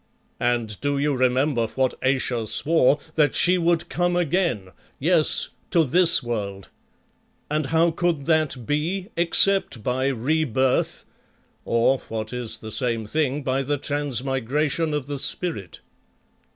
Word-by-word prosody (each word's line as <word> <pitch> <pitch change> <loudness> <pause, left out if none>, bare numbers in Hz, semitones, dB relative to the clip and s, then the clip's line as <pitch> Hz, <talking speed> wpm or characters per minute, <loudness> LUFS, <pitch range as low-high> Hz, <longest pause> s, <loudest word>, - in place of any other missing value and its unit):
And 120 -4 -1
do 145 0 -1
you 145 0 0
remember 130 -1 +1
what 130 +2 -1
Ayesha 130 -4 0
swore, 145 +2 +2 0.2
that 150 -2 +2
she 180 +1 +3
would 170 -1 +1
come 175 +4 -1
again 170 - 0 0.3
yes, - - +3 0.2
to 170 - +3
this 170 +1 +4
world; 100 -5 -5 0.8
and 150 -2 -1
how 165 +3 +2
could 165 -4 -1
that 155 -6 0
be 175 - -2
except 170 - +3
by 130 +3 -1
re 140 +5 0
birth, 130 -1 0 0.6
or, 115 +3 +2
what 110 0 -5
is 125 -2 -3
the 110 - -8
same 115 -2 -1
thing, 145 +3 -1
by 130 +1 0
the 145 +2 -1
transmigration 145 +3 -1
of 145 -3 -3
the 145 0 -5
spirit?" 135 - -3
140 Hz, 135 wpm, -23 LUFS, 125-160 Hz, 0.8 s, this